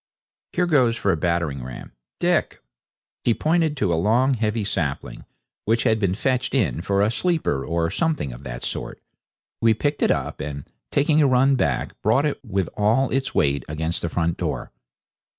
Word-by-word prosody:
Here 180 - +2
goes 130 -8 +3
for 100 - +1
a - - +2
battering 80 -5 -1
ram, 65 0 -8 0.3
Dick!' - - +1 0.6
He 115 - +2
pointed 160 -2 +1
to 95 -8 +1
a 80 - +1
long, 125 +7 +3
heavy 110 -2 -1
sapling 70 -7 -3 0.4
which 115 +2 +2
had 110 -3 +2
been 95 -3 +1
fetched 130 +4 0
in 85 - +1
for 100 +2 +1
a 105 - +2
sleeper 160 - 0
or 85 +1 -1
something 155 - -1
of - - -11
that - - -7
sort. - - -4 0.6
We 115 -1 +4
picked 145 +6 -1
it - - +3
up, - - -1
and, 70 -1 -5 0.2
taking 150 +2 +3
a 145 - +5
run 135 +1 +4
back, 70 - 0
brought 115 +8 +3
it 150 - -2
with 100 -6 -1
all 115 +6 +2
its 135 +1 -1
weight 70 -3 +2
against 80 +2 -2
the 85 - -2
front 85 0 -1
door. - - -3
105 Hz, 180 wpm, -23 LUFS, 80-135 Hz, 0.6 s, a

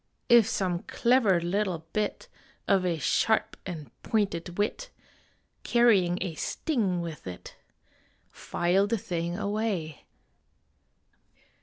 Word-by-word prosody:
If 235 -3 +7
some 185 -5 -1
clever 235 -7 +3
little 175 -1 -1
bit 215 -1 -2 0.4
Of 190 -2 +3
a 170 -2 0
sharp 220 +7 +1
and 160 -6 -7
pointed 180 -5 -1
wit, 225 - -1 0.7
Carrying 205 -8 +3
a 185 -4 -2
sting 195 - -1
with 165 - -7
it 90 -1 -9 0.8
File 185 +4 +1
the 230 - 0
thing 175 -2 -3
away. 200 -7 -2
190 Hz, 105 wpm, -28 LUFS, 170-215 Hz, 0.8 s, If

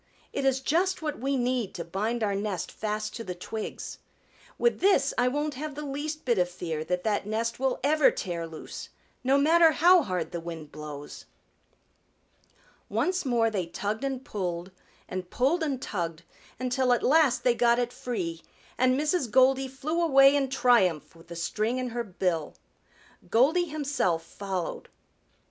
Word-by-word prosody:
It 275 - -1
is 265 0 +2
just 350 +5 +1
what 300 -1 -3
we 270 +2 0
need 245 -4 -1
to 170 - -5
bind 215 +7 -2
our 205 -2 +1
nest 195 -3 -3
fast 215 0 -3
to 230 - -5
the 180 -4 -5
twigs. 215 +4 -6 0.6
With 475 - +2
this 395 +1 +3
I 245 - +2
won't 295 +3 -1
have 290 +2 -6
the 300 0 -5
least 295 +2 -4
bit 235 -6 +2
of 180 0 +2
fear 165 -3 -4
that 180 +2 -1
that 205 -2 0
nest 230 +2 -2
will 265 -1 0
ever 300 +1 +5
tear 170 -3 -4
loose, 160 -1 -8 0.3
no 265 +2 +4
matter 320 +3 +5
how 350 +4 +6
hard 185 - -3
the 170 - -3
wind 165 -3 -7
blows." 150 -1 -8 1.6
Once 365 -2 0
more 235 -3 +2
they 185 -5 -2
tugged 205 +7 -3
and 265 -1 -3
pulled 180 -6 -4 0.4
and 185 -1 -5
pulled 280 - +1
and 285 -5 -1
tugged 170 -8 -4 0.4
until 255 0 +2
at 240 - 0
last 275 -5 +4
they 245 - +4
got 235 0 +3
it 245 0 -1
free, 175 -9 -4 0.4
and 255 +1 +3
Mrs. 300 -3 0
Goldy 265 +3 +4
flew 285 +6 -2
away 275 -3 +6
in 275 -2 +1
triumph 235 - +2
with 165 0 -17
the 170 - -8
string 215 +8 -1
in 255 -1 -2
her 240 0 -3
bill. 180 -6 -2 0.7
Goldy 295 - +4
himself 285 - -1
followed. 190 -1 -5
240 Hz, 165 wpm, -28 LUFS, 185-275 Hz, 1.6 s, how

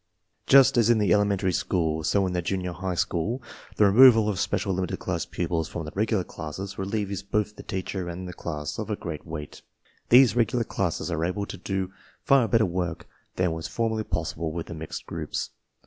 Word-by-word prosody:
f 90 0 -30
Just 135 -1 +7
as 115 -1 +4
in 120 - +5
the 105 -4 +3
elementary 100 -2 +2
school, 80 -4 0
so 95 +5 +2
in 90 - -2
the 90 - 0
junior 90 +1 -2
high 95 0 -3
sShoof 95 +9 -1 0.4
tEe - - +5
removal 115 +1 +7
of 100 - -2
special 95 -1 0
limited 90 0 -2
class - - -3
pupils 85 -2 -2
from 85 - -5
I - - -7
the"regular 105 -1 0
classes 95 +5 -7
relieves 100 0 -2
both 105 +1 -1
the - - -9
teacher 95 -1 -4
and 90 +2 -6
they - - -5
class 75 -3 -5
of 110 - -4
a 105 - 0
great 85 -4 -7
weight. 75 -2 -7 0.5
These 125 -3 +7
regular 120 0 +2
classes 90 -5 -2
are 80 -1 -1
able 90 +4 -1
to - - -7
do 95 -1 -3 0.3
far 135 -4 +4
better 110 +1 +3
work 85 -2 -3 0.3
than 90 -2 +1
was 80 0 -4
formerly 110 -1 -1
possible 85 -3 -3
with 85 0 -4
the - - -8
mixed 80 -1 -7
groups. - - -4
95 Hz, 200 wpm, -26 LUFS, 85-105 Hz, 0.5 s, Just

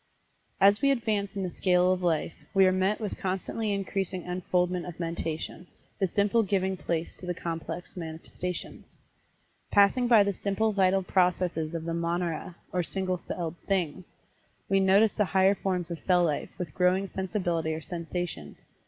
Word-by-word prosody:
As 200 +2 +5
we 275 - +4
advance 220 -6 0
in 195 - -2
the 180 - -3
scale 180 0 +3
of 185 - -3
life, 165 -2 0 0.2
we 195 0 +7
are 185 - +5
met 190 +3 +1
with 215 -3 -4
constantly 195 +3 -2
increasing 195 -2 -2
unfoldment 180 0 -1
of 175 -1 -8
mentation, 165 0 -4 0.3
the 195 - +2
simple 205 +5 +2
giving 190 -2 0
place 170 -2 -2
to 180 - -9
the 180 - -1
complex 170 +1 -5
manifestations. 170 +1 -6 0.7
Passing 205 +5 +4
by 225 -4 +7
the 200 0 0
simple 205 +4 0
vital 190 -1 +3
processes 180 -3 +1
of 165 -1 -4
the 170 - -2
monera, 170 0 -2 0.2
or 180 - +2
single 185 +1 -2
celled 170 -1 -5
"things," 185 -2 -2 0.5
we 195 - +3
notice 195 +3 +5
the 210 - +1
higher 190 +1 +6
forms 180 -3 -2
of 170 - -4
cell 180 -2 +3
life, 150 -4 -1
with 170 -5 -5
growing 185 +2 +2
sensibility 175 -4 -1
or 160 0 -3
sensation. 175 +1 -5
185 Hz, 160 wpm, -28 LUFS, 170-195 Hz, 0.7 s, we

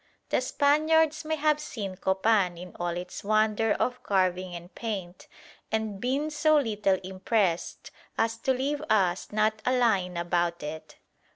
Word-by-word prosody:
The - - +2
Spaniards 305 +1 +2
may 315 0 0
have 305 0 +2
seen 210 -10 -5
Copan 190 -1 +1
in 180 +1 -10
all 175 0 -2
its 180 0 -7
wonder 215 +1 +2
of 250 0 -1
carving 185 -2 0
and 175 +2 -10
paint, 195 -6 -5 0.4
and 220 -3 -2
been 275 +5 -1
so 305 +1 +3
little 210 -7 +1
impressed 190 -1 -1 0.3
as 225 0 +1
to 265 - 0
leave 275 +3 -1
us 190 -4 +1
not 215 +1 +1
a 255 0 +2
line 195 -7 +1
about 170 -1 0
it. 155 +1 -7
215 Hz, 150 wpm, -27 LUFS, 180-255 Hz, 0.4 s, so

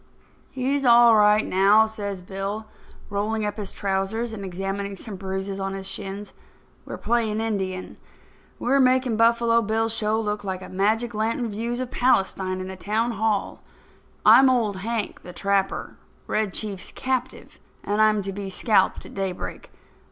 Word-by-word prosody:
"He's 270 +2 -1
all 235 -2 +7
right 210 0 +5
now," 200 +4 +5
says 200 -4 -5
Bill, 195 +3 -4 0.5
rolling 210 +2 -1
up 210 0 -3
his 205 -3 -5
trousers 200 +4 -2
and 200 -2 -6
examining 195 +2 -4
some 205 +1 -7
bruises 190 +1 -4
on 195 0 -3
his 190 0 -6
shins. 195 +1 -6 0.5
"We're - - -6
playing 225 -2 0
Indian. 190 -4 -3 0.6
We're 270 +3 +2
making 255 -3 +3
Buffalo 230 0 +4
Bill's 225 +1 0
show 220 0 +1
look 210 -1 -2
like 190 -1 -4
magic 220 +5 +1
lantern 225 +2 -1
views 235 +4 -3
of 255 -1 -4
Palestine 190 -6 +1
in 185 - -5
the 190 - -6
town 215 +6 -1
hall. 215 -2 -1 0.6
I'm 265 0 +8
Old 225 -6 +1
Hank, 220 +2 -3
the 180 - -10
Trapper, 195 +1 -1 0.3
Red 215 -2 -1
Chief's 195 -2 -3
captive, 260 -1 -4 0.2
and 205 +1 0
I'm 215 -1 +3
to 195 0 -4
be 200 0 -5
scalped 190 0 +2
at - - -12
daybreak. 190 -2 -5
210 Hz, 150 wpm, -24 LUFS, 195-225 Hz, 0.6 s, I'm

